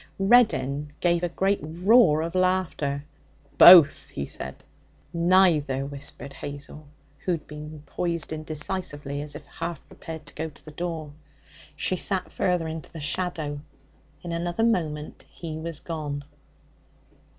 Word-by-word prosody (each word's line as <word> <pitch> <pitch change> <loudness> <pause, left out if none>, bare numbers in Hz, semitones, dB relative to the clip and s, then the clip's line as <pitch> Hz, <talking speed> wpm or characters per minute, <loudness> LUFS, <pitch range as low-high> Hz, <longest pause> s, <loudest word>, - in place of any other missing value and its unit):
Reddin 150 - +3
gave 170 -1 +2
a 175 - 0
great 195 +4 +1
roar 165 - +4
of 165 - -4
laughter. 185 -6 0 0.5
'Both!' 175 -5 +9
he 70 - -4
said. - - -8 0.5
'Neither!' 170 -6 +3
whispered 140 0 -8
Hazel, 145 +2 -8 0.3
who 180 - -1
had 165 - -4
been 150 0 -9
poised 170 -3 -3
indecisively, 155 -2 -4
as 145 0 -7
if 150 - -9
half 165 -2 -6
prepared 160 -2 -9
to 145 - -13
go 160 +1 -4
to 145 - -20
the 155 - -9
door. 160 -2 -5 0.6
She 185 - 0
sat 185 0 -1
further 180 -4 0
into 160 0 -7
the 165 - -8
shadow. 150 -1 -2 0.6
In 175 - -5
another 175 +5 -1
moment 155 -9 -1
he 160 -2 -7
was 165 -1 -5
gone. 150 -4 -4
160 Hz, 135 wpm, -26 LUFS, 150-175 Hz, 0.6 s, Both